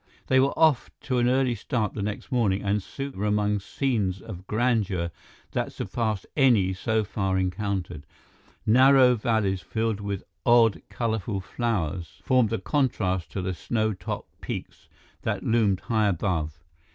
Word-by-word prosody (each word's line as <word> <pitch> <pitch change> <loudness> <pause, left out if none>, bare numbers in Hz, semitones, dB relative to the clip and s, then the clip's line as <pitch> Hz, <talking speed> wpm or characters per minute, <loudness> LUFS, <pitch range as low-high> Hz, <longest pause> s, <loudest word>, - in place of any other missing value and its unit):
They 130 - +4
were 135 +1 +2
off 155 -6 +4
to 130 -3 0
an 120 0 +3
early 130 -1 +2
start 110 -1 -2
the 105 - -4
next 105 +6 -4
morning 105 -6 +1
and 100 +1 +1
soon 140 +8 -6
were 105 -3 -3
among 105 0 +1
scenes 100 -4 -1
of 95 0 -9
grandeur 105 -7 0 0.4
that - - -2
surpassed 110 -4 -2
any 115 -10 +4
so 110 +3 0
far 95 -2 -1
encountered. 95 -4 -2 0.6
Narrow 130 +2 +6
valleys 105 -5 0
filled 110 -2 -1
with 100 -2 -4 0.2
odd, 120 -3 +5
colorful 110 -3 -2
flowers 95 -6 -3
formed 125 -4 +3
a 115 - +1
contrast 105 - 0
to 95 - -2
the 95 0 -1
snow 110 +4 -1
topped 90 -2 -7
peaks - - -6 0.3
that - - -2
loomed 105 -5 +2
high 110 -3 +1
above. 80 -5 -1
105 Hz, 150 wpm, -26 LUFS, 95-120 Hz, 0.6 s, Narrow